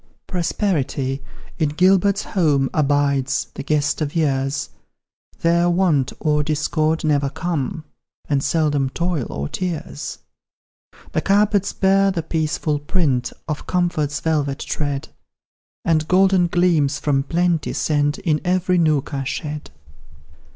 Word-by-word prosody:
Prosperity, 155 Hz, -7 st, -1 dB, 0.4 s
in 155 Hz, -3 st, +2 dB
Gilbert's 190 Hz, +5 st, +3 dB
home, 145 Hz, -8 st, +1 dB
Abides 140 Hz, -3 st, +1 dB
the -, -, -6 dB
guest 150 Hz, +2 st, 0 dB
of 150 Hz, 0 st, -2 dB
years; 135 Hz, -3 st, 0 dB, 0.7 s
There 170 Hz, +1 st, +3 dB
Want 170 Hz, -7 st, +2 dB
or 150 Hz, -1 st, +1 dB
Discord 155 Hz, +1 st, 0 dB
never 145 Hz, -3 st, +2 dB
come, 160 Hz, +1 st, -3 dB, 0.4 s
And 140 Hz, -2 st, +1 dB
seldom 145 Hz, -4 st, +1 dB
Toil 170 Hz, -3 st, -1 dB
or 70 Hz, 0 st, -3 dB
Tears. 165 Hz, -, -4 dB, 0.9 s
The -, -, 0 dB
carpets 200 Hz, 0 st, +2 dB
bear 195 Hz, 0 st, +3 dB
the 175 Hz, -4 st, -2 dB
peaceful 155 Hz, -2 st, -1 dB
print 145 Hz, -6 st, 0 dB, 0.2 s
Of 150 Hz, -2 st, -4 dB
comfort's 165 Hz, -5 st, 0 dB
velvet 145 Hz, -4 st, 0 dB
tread, 145 Hz, -2 st, -3 dB, 0.8 s
And 155 Hz, -2 st, +2 dB
golden 185 Hz, 0 st, +4 dB
gleams, 165 Hz, -5 st, +2 dB
from 140 Hz, -2 st, +1 dB
plenty 170 Hz, +2 st, 0 dB
sent, 145 Hz, -1 st, +1 dB
In 155 Hz, -4 st, 0 dB
every 180 Hz, 0 st, +1 dB
nook 155 Hz, -3 st, +1 dB
are 135 Hz, -1 st, -2 dB
shed. 150 Hz, +2 st, -5 dB
155 Hz, 120 wpm, -21 LUFS, 145-175 Hz, 0.9 s, golden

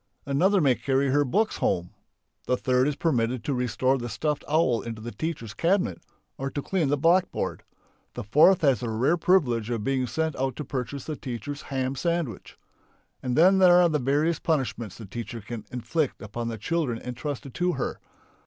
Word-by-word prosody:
another 185 Hz, +9 st, +3 dB
may 135 Hz, -4 st, +4 dB
carry 135 Hz, +1 st, 0 dB
her 145 Hz, +2 st, +3 dB
books 210 Hz, -, 0 dB
home; 90 Hz, 0 st, 0 dB, 0.6 s
the 125 Hz, -, +2 dB
third 130 Hz, +1 st, +2 dB
is 150 Hz, -, -1 dB
permitted 125 Hz, -7 st, 0 dB
to 140 Hz, -, -1 dB
restore 125 Hz, +2 st, +1 dB
the 120 Hz, 0 st, -5 dB
stuffed 150 Hz, +4 st, -2 dB
owl 145 Hz, -7 st, +2 dB
into 115 Hz, -2 st, -6 dB
the 115 Hz, +2 st, -6 dB
teacher's 140 Hz, -10 st, -4 dB
cabinet, 170 Hz, -, 0 dB, 0.4 s
or 135 Hz, +1 st, -2 dB
to 145 Hz, -, -4 dB
clean 170 Hz, +1 st, 0 dB
the 145 Hz, -, +2 dB
blackboard; 175 Hz, +5 st, +1 dB, 0.5 s
the -, -, -4 dB
fourth 155 Hz, -, +5 dB
has 135 Hz, -7 st, +3 dB
the 120 Hz, -, -3 dB
rare 125 Hz, +9 st, +2 dB
privilege 135 Hz, -, +2 dB
of 115 Hz, -3 st, -2 dB
being 130 Hz, 0 st, 0 dB
sent 160 Hz, +6 st, -1 dB
out 130 Hz, -1 st, -1 dB
to 150 Hz, -, -5 dB
purchase 130 Hz, 0 st, -4 dB
the 155 Hz, -, -4 dB
teacher's 135 Hz, +2 st, -6 dB
ham 130 Hz, -1 st, -1 dB
sandwich! 170 Hz, -, -3 dB, 0.6 s
And 125 Hz, -1 st, -2 dB
then 190 Hz, +4 st, +6 dB
there 180 Hz, -2 st, +7 dB
are 175 Hz, -1 st, +5 dB
the 150 Hz, -2 st, +1 dB
various 150 Hz, +5 st, +1 dB
punishments 120 Hz, -, -2 dB
the 110 Hz, -, -9 dB
teacher 115 Hz, +4 st, -6 dB
can 110 Hz, +1 st, -7 dB
inflict 140 Hz, +4 st, -2 dB
upon 115 Hz, +3 st, -5 dB
the 115 Hz, -1 st, -4 dB
children 130 Hz, -, -1 dB
entrusted 130 Hz, +1 st, -6 dB
to 180 Hz, 0 st, 0 dB
her. 135 Hz, -, -3 dB
135 Hz, 185 wpm, -26 LUFS, 120-160 Hz, 0.6 s, there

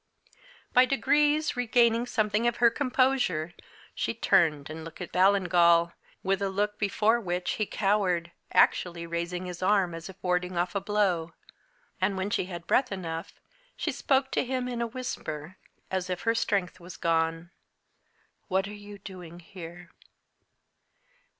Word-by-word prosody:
By 250 Hz, 0 st, +7 dB
degrees, 295 Hz, +3 st, +2 dB
regaining 240 Hz, -1 st, +3 dB
something 215 Hz, 0 st, +1 dB
of 240 Hz, -, +1 dB
her 235 Hz, 0 st, +5 dB
composure, 255 Hz, -, +1 dB, 0.4 s
she -, -, -2 dB
turned 160 Hz, -10 st, +2 dB
and 160 Hz, +1 st, -7 dB
looked 165 Hz, 0 st, -10 dB
at 180 Hz, -, -6 dB
Ballingall, 175 Hz, -3 st, +4 dB, 0.3 s
with 195 Hz, 0 st, 0 dB
a 195 Hz, -, 0 dB
look 205 Hz, +2 st, -1 dB
before 215 Hz, +3 st, +2 dB
which 180 Hz, -4 st, -2 dB
he 215 Hz, -, -1 dB
cowered, 190 Hz, -4 st, +1 dB, 0.2 s
actually 170 Hz, -1 st, +2 dB
raising 170 Hz, +2 st, -3 dB
his 180 Hz, -1 st, -7 dB
arm 185 Hz, -2 st, +2 dB
as 165 Hz, +2 st, -7 dB
if 190 Hz, -, -10 dB
warding 180 Hz, 0 st, 0 dB
off 175 Hz, +1 st, 0 dB
a 200 Hz, -, -1 dB
blow. 190 Hz, -5 st, 0 dB, 0.7 s
And, 190 Hz, +1 st, +1 dB
when 190 Hz, +2 st, -2 dB
she -, -, 0 dB
had 175 Hz, -2 st, -7 dB
breath 255 Hz, +7 st, +2 dB
enough, 165 Hz, -4 st, -5 dB, 0.4 s
she 330 Hz, -, -1 dB
spoke 270 Hz, 0 st, +1 dB
to -, -, +1 dB
him, 255 Hz, -1 st, -2 dB
in 240 Hz, -1 st, -3 dB
a 235 Hz, -, 0 dB
whisper, 185 Hz, -, -6 dB, 0.3 s
as 185 Hz, -1 st, -2 dB
if 180 Hz, -1 st, -3 dB
her 230 Hz, -, +2 dB
strength 200 Hz, -5 st, -1 dB
was 175 Hz, 0 st, -10 dB
gone. 165 Hz, +1 st, 0 dB, 1.0 s
"What 190 Hz, 0 st, 0 dB
are 205 Hz, -, -8 dB
you 205 Hz, 0 st, -10 dB
doing 180 Hz, -4 st, -10 dB
here?" 175 Hz, 0 st, -11 dB
190 Hz, 150 wpm, -28 LUFS, 175-225 Hz, 1.0 s, By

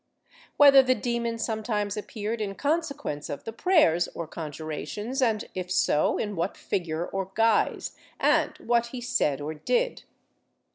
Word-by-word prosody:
Whether 280 Hz, -2 st, +9 dB
the 255 Hz, -1 st, +2 dB
demon 235 Hz, 0 st, -2 dB
sometimes 215 Hz, -2 st, -2 dB
appeared 215 Hz, +1 st, -4 dB
in 200 Hz, -2 st, -3 dB
consequence 290 Hz, -, -2 dB
of 140 Hz, -, -5 dB
the 225 Hz, -, -6 dB
prayers 230 Hz, -, +3 dB
or 170 Hz, -, -4 dB
con 160 Hz, -1 st, -6 dB
jurations 205 Hz, -, -4 dB
and, 225 Hz, -4 st, +1 dB
if 180 Hz, -1 st, -4 dB
so, 165 Hz, -4 st, +2 dB
in 210 Hz, -1 st, -3 dB
what 170 Hz, +3 st, -2 dB
figure 170 Hz, -2 st, -2 dB
or 195 Hz, 0 st, -4 dB
guise, 225 Hz, -1 st, +1 dB, 0.2 s
and -, -, +2 dB
what 235 Hz, 0 st, +1 dB
he 250 Hz, +1 st, -7 dB
said 240 Hz, -, 0 dB
or 150 Hz, +2 st, -4 dB
did. 485 Hz, -, 0 dB
215 Hz, 150 wpm, -27 LUFS, 175-245 Hz, 0.2 s, Whether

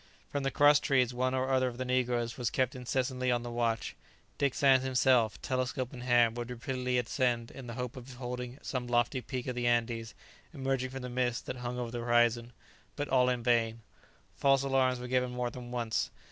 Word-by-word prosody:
From 145 Hz, -, -1 dB
the 135 Hz, -, 0 dB
cross 145 Hz, +2 st, +5 dB
trees 130 Hz, -4 st, +2 dB
one 130 Hz, +1 st, 0 dB
or 130 Hz, +1 st, 0 dB
other 130 Hz, -1 st, +3 dB
of 120 Hz, -1 st, -5 dB
the 130 Hz, -, -3 dB
negroes 125 Hz, -2 st, 0 dB
was 120 Hz, -3 st, -1 dB
kept 130 Hz, 0 st, 0 dB
incessantly 130 Hz, 0 st, -1 dB
on 120 Hz, -1 st, +1 dB
the 120 Hz, -, -5 dB
watch. 115 Hz, -1 st, -1 dB, 0.4 s
Dick 140 Hz, -2 st, +1 dB
Sands 135 Hz, -2 st, +5 dB
himself, 125 Hz, -3 st, +3 dB
telescope 130 Hz, 0 st, -2 dB
in 125 Hz, -, -8 dB
hand, 120 Hz, -2 st, +3 dB
would 120 Hz, 0 st, -4 dB
repeatedly 125 Hz, +1 st, -2 dB
ascend 120 Hz, -1 st, 0 dB
in 135 Hz, -2 st, -9 dB
the 115 Hz, -, -6 dB
hope 125 Hz, -1 st, -4 dB
of 125 Hz, -1 st, -9 dB
beholding 125 Hz, 0 st, -6 dB
some 125 Hz, -2 st, -3 dB
lofty 120 Hz, +2 st, +1 dB
peak 125 Hz, -1 st, -5 dB
of 125 Hz, -, -2 dB
the 120 Hz, 0 st, -1 dB
Andes 115 Hz, -2 st, 0 dB, 0.4 s
emerging 135 Hz, -1 st, -1 dB
from 135 Hz, 0 st, -7 dB
the 125 Hz, -, -4 dB
mists 120 Hz, -1 st, -1 dB
that -, -, -5 dB
hung 125 Hz, 0 st, -4 dB
over 120 Hz, -2 st, -3 dB
the 120 Hz, -, -4 dB
horizon. 120 Hz, 0 st, +2 dB, 0.4 s
But 145 Hz, -1 st, -3 dB
all 125 Hz, -1 st, +4 dB
in 125 Hz, -2 st, -1 dB
vain. 115 Hz, -2 st, +2 dB, 0.5 s
False 135 Hz, -1 st, +3 dB
alarms 130 Hz, -2 st, +2 dB
were 125 Hz, -, -6 dB
given 125 Hz, 0 st, +1 dB
more 125 Hz, -1 st, -2 dB
than 120 Hz, 0 st, -9 dB
once. 120 Hz, -2 st, -1 dB
125 Hz, 205 wpm, -31 LUFS, 120-130 Hz, 0.5 s, cross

